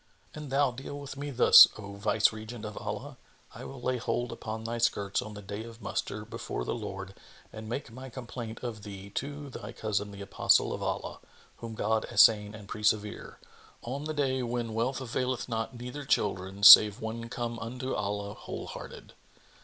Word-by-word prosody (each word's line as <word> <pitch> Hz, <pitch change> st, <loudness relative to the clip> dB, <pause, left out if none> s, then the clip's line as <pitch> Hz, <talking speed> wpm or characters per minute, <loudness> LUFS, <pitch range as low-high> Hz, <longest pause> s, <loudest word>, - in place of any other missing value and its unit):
An 150 Hz, -2 st, -8 dB
thou 135 Hz, 0 st, +2 dB
deal 135 Hz, +3 st, -7 dB
with 140 Hz, -1 st, -8 dB
me 145 Hz, +1 st, -5 dB
thus, 130 Hz, -3 st, +9 dB
O 100 Hz, -1 st, -8 dB
Viceregent 110 Hz, +2 st, 0 dB
of 105 Hz, -1 st, -6 dB
Allah, -, -, -6 dB, 0.4 s
I -, -, -9 dB
will 135 Hz, -, -8 dB
lay 130 Hz, +1 st, -1 dB
hold 120 Hz, 0 st, -2 dB
upon 110 Hz, 0 st, -6 dB
thy 115 Hz, +1 st, -3 dB
skirts 100 Hz, -4 st, +1 dB
on 110 Hz, 0 st, -8 dB
the 105 Hz, -, -9 dB
Day 100 Hz, +2 st, -6 dB
of 115 Hz, 0 st, -11 dB
Muster -, -, -4 dB
before -, -, -5 dB
the -, -, -2 dB
Lord 95 Hz, -4 st, -6 dB, 0.4 s
and 110 Hz, 0 st, -8 dB
make 120 Hz, 0 st, -4 dB
my 130 Hz, +3 st, -9 dB
complaint 120 Hz, -2 st, -7 dB
of 115 Hz, -4 st, -5 dB
thee 100 Hz, -1 st, -9 dB
to 145 Hz, +4 st, -5 dB
thy -, -, -8 dB
cousin 105 Hz, -1 st, -2 dB
the 100 Hz, 0 st, -10 dB
Apostle 100 Hz, -, +3 dB
of -, -, -5 dB
Allah -, -, -3 dB, 0.4 s
(whom 115 Hz, -1 st, -7 dB
God 110 Hz, +1 st, 0 dB
assain 105 Hz, +1 st, +5 dB
and 105 Hz, -2 st, -11 dB
preserve!) 105 Hz, 0 st, -1 dB, 0.5 s
on 135 Hz, +5 st, -5 dB
the 155 Hz, 0 st, -3 dB
Day 130 Hz, -3 st, 0 dB
when 120 Hz, -2 st, -3 dB
wealth 120 Hz, +4 st, -1 dB
availeth 130 Hz, 0 st, -2 dB
not 115 Hz, +1 st, -3 dB
neither 125 Hz, +4 st, -6 dB
children 100 Hz, -5 st, -1 dB
save 105 Hz, +1 st, +11 dB
one 115 Hz, 0 st, -5 dB
come 120 Hz, -1 st, -4 dB
unto 125 Hz, +3 st, -4 dB
Allah 100 Hz, 0 st, -3 dB
wholehearted!" -, -, -8 dB
115 Hz, 175 wpm, -29 LUFS, 105-125 Hz, 0.5 s, save